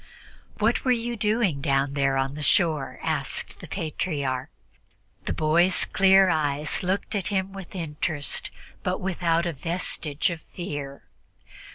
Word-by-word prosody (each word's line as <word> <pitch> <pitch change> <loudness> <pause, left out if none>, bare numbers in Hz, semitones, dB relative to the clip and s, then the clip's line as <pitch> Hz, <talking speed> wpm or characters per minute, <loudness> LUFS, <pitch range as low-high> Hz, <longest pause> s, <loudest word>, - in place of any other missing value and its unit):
"What - - +2
were 255 - +3
you 240 0 0
doing 210 -8 +1
down 135 -1 +1
there 135 -1 +2
on 135 +1 0
the 150 - -6
shore?" 150 -2 +1
asked - - -1
the - - -9
Patriarch. 140 -5 -2 0.8
The - - -1
boy's 170 +4 +3
clear 190 0 +5
eyes 150 -3 +1
looked 190 +2 -1
at 200 -3 -1
him 190 -1 -1
with 195 -1 -9
interest, 150 -3 -2 0.3
but - - -1
without 170 -2 +1
a 170 - -1
vestige 160 0 -1
of 165 -2 -6
fear. 145 -5 -6
165 Hz, 140 wpm, -26 LUFS, 145-190 Hz, 0.8 s, clear